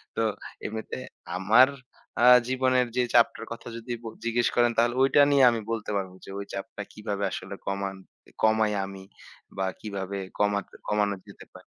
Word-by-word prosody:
তো - - 0 0.4
এমনিতে 110 -7 -5 0.4
আমার 115 +7 +6 0.6
আ - - +7 0.2
জীবনের 130 -1 +2
যে 125 - +3
চাপটার 115 -1 +3
কথা 115 - -7
যদি 115 +2 -8
ব - - -12 0.2
জিজ্ঞেস 120 +1 +2
করেন 120 -1 +4
তাহলে 120 +1 +3
ওইটা 135 +2 +5
নিয়ে 140 -2 +5
আমি 115 - -2
বলতে 110 -2 -3
পারবো 95 -2 -4
যে - - -12
ওই 100 - -5
চাপটা 105 +1 -6
কীভাবে 105 -2 -4
আসলে 95 +4 -6
কমান 100 0 -2 0.3
ই - - -22
কমাই 110 -1 +4
আমি 95 -1 -9 0.5
বা 95 - 0
কীভাবে 100 -2 -5 0.2
কমাতে 105 -1 0
কমানো 105 -1 +1
যেতে - - -13
পারে? - - -14
110 Hz, 170 wpm, -27 LUFS, 100-120 Hz, 0.6 s, আ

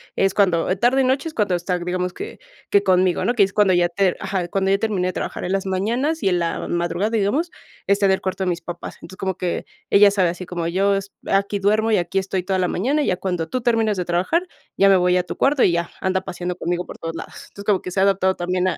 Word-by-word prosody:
es 195 0 +2
cuando 180 -3 +2
tarde 245 +6 +3
y - - +2
noche 265 +4 +1
es 320 - -6
cuando 205 -7 0
está 180 +1 -1
digamos 180 +1 -2
que 430 - -8 0.3
que 200 - +4
conmigo, 185 -2 +2
¿no?, 240 - +2
que 225 -5 +4
es 195 - 0
cuando 205 -2 +3
ya 175 -1 +3
ter 185 +1 +1
ajá. 185 -3 -2
Cuando 190 +2 0
ya 195 - +4
terminé 200 -4 -1
de - - -4
trabajar, - - -4
en 180 - -3
las 195 0 0
mañanas 235 +12 -1
y 195 - +3
en 180 -1 +1
la 170 -1 -2
madrugada, 175 +4 -1
digamos, 230 - 0 0.4
está 200 0 +3
en 190 - +4
el 190 - -1
cuarto 190 0 -2
de - - 0
mis 175 -1 -2
papás. 175 0 -7
Entonces, 185 +3 -11
como 190 -2 -2
que 180 -1 -3 0.2
ella 200 0 +6
sabe 190 -3 +2
así 180 +2 -6
como 175 -1 -4
yo 195 +3 +2
es 195 0 -4 0.2
aquí 200 +1 +1
duermo 215 +3 +2
y 215 - +4
aquí 180 +2 0
estoy 190 -1 -2
toda 190 +1 -1
la 180 -1 +1
mañana, 275 +11 0
y - - -2
ya 180 - +1
cuando 180 -4 -3
tú 255 - -1
termines 225 -4 +1
de 180 - -2
trabajar, 190 - 0 0.3
ya 195 - +5
me 195 - +6
voy 180 0 +3
a 180 - +1
tu - - -6
cuarto 275 -1 +2
y 175 - +4
ya, 170 0 -1
anda 190 0 0
paseando 180 -1 -5
conmigo 175 +1 -2
por - - -9
todos 165 0 -5
lados. - - -8 0.2
Entonces, 200 - -11
como 200 -3 +2
que 180 - -6
se 190 - -1
ha - - +4
adaptado 190 -1 +2
también 180 +1 0
a - - -3
190 Hz, 270 wpm, -21 LUFS, 180-205 Hz, 0.4 s, ella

